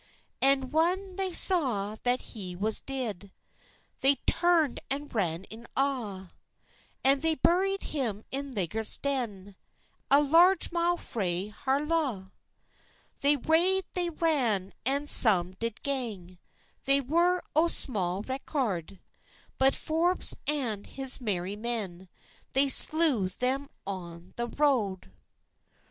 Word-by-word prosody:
An 270 -1 +2
whan 365 +4 +1
they 380 -1 -1
saw 250 - +3
that 245 +1 +1
he 185 -6 -6
was 210 +4 +1
deid, 215 -8 -5 0.7
They 275 +1 +4
turnd 340 -6 +1
and 285 +1 -5
ran 180 -4 -2 0.3
awa, 225 -10 -3 0.7
An 275 +1 +4
they 320 +2 0
buried 385 +6 0
him 230 -8 -3
in 275 +1 -4
Legget's 210 +2 +1
Den, 210 -9 -4 0.5
A 280 - +6
large 335 +6 +3
mile 345 0 0
frae 190 - -4
Harlaw. 270 -3 -2 0.9
They 285 +1 +3
rade, 345 +7 +1
they 355 -1 -1
ran, 255 - 0
an 280 +2 0
some 190 -11 +5
did 230 -1 -5
gang, 215 -11 -5 0.5
They 275 +1 +4
were 340 +7 0
o 320 +2 +3
sma 195 - +2
record; 225 - -4 0.6
But 265 +1 +3
Forbës 335 +3 0
and 250 -9 -2
his 265 -1 -1
merry 195 -3 -3
men, 205 -5 -6 0.4
They 275 +1 +3
slew 285 - +6
them 265 +7 -2 0.2
a' 175 -4 -7
the 240 0 -3
road. 230 - -1
265 Hz, 115 wpm, -27 LUFS, 200-305 Hz, 0.9 s, A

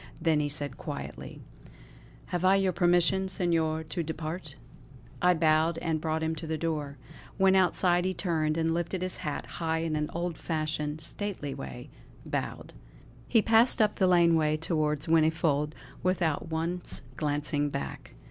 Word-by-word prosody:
Then 160 -2 +2
he 145 -1 0
said 145 -3 -4
quietly: - - -7 0.9
"Have 175 0 0
I 190 +1 +5
your 195 -1 +2
permission, 175 +2 +3
Senor, 165 -4 0
to 165 +2 -3
depart?" 160 -1 -5 0.7
I 180 0 +5
bowed, 160 +1 +3
and 160 -2 -1
brought 160 0 -1
him 160 0 0
to 165 - -6
the 160 0 -1
door. 150 -4 -3 0.4
When 190 -1 +5
outside 180 -1 +3
he 185 - 0
turned, 160 -3 0
and, 165 0 +1
lifting 175 +2 -2
his 185 0 -2
hat 150 -1 -4
high 160 -1 -2
in 160 -2 -1
an 150 0 -1
old 170 0 -3
fashioned, 155 -1 -2
stately 170 -4 -4
way, 65 -2 -8 0.3
bowed. - - -4 0.5
He 225 -3 +4
passed 225 +2 +5
up 215 -1 +2
the 190 - +3
laneway 165 -4 +4
towards 155 -2 -1
Whinnyfold, 155 -2 +2 0.3
without 170 -4 0
once 165 +1 -2
glancing 145 0 -1
back. 140 - -6
160 Hz, 150 wpm, -29 LUFS, 155-175 Hz, 0.9 s, I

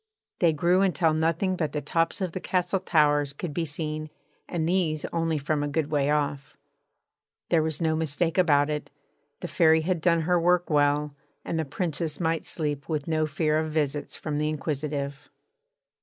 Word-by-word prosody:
They 170 -2 +4
grew 170 +5 +2
until 180 -4 +2
nothing 165 +4 +1
but 160 -4 -2
the 150 - -1
tops 165 +4 0
of 185 -3 -1
the 185 - -4
castle 185 +1 0
towers 145 -5 +2
could 150 +1 -5
be 170 +1 -1
seen, 155 0 -4 0.4
and 165 -2 -1
these 165 -4 0
only 165 -1 0
from 150 +1 -1
a 145 - -1
good 150 +1 -1
way 145 -2 +1
off. 145 -2 -1 0.9
There 165 -2 +4
was 155 -1 -2
no 160 -1 +2
mistake 160 +3 0
about 145 -4 +4
it: 150 0 -4 0.5
the 175 - -4
Fairy 160 -2 +4
had 175 0 -1
done 170 0 +3
her 175 +2 +2
work 175 0 +2
well, 145 0 +2 0.3
and 165 - -2
the 160 - -1
Princess 160 +1 -3
might 165 -2 0
sleep 145 -3 -3
with 150 -3 -2
no 155 -1 +1
fear 155 +1 +1
of 155 0 -2
visits 150 -2 -1
from 150 -2 -3
the 150 0 0
inquisitive. 145 -1 -3
155 Hz, 180 wpm, -26 LUFS, 150-170 Hz, 0.9 s, They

